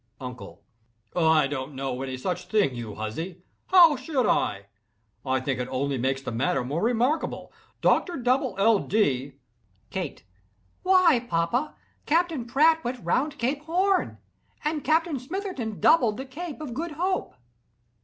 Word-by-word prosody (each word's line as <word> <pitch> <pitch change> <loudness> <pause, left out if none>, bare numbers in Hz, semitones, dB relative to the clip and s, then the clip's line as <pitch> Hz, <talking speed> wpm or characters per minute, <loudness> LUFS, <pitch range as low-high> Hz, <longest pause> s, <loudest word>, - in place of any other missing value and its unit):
UNCLE. 100 -8 -9 0.5
"I 160 -3 +4
don't 140 0 -4
know 130 -1 -3
any 130 -1 -4
such 180 +7 -3
thing, 205 - +2
you 115 -4 -6
huzzy! 160 - -5 0.2
How 345 -5 +7
should 260 -1 -1
I? 100 0 0 0.6
I 130 -1 0
think 130 0 -2
it 125 - -2
only 135 +1 -1
makes 135 +2 -1
the 130 - -4
matter 130 +6 0
more 145 +7 -2
remarkable, 245 +7 0 0.3
Doctor 350 -4 +2
Dubble 250 -4 +1
L. 210 +1 +4
Dee—" 140 - 0 0.6
KATE. 180 - -5 0.6
"Why, 345 -10 +4
papa, 170 - 0 0.3
Captain 325 -5 +1
Pratt 315 +6 +3
went 240 -5 -5
round 285 - 0
Cape 275 +4 -1
Horn, 370 +4 +1 0.5
and 300 -1 -1
Captain 315 0 +1
Smitherton 275 - -5
doubled 240 -10 +4
the 265 - -5
Cape 310 +3 -7
of 280 -6 -5
Good 320 +5 -4
Hope." 370 +5 -2
230 Hz, 145 wpm, -26 LUFS, -, 0.6 s, How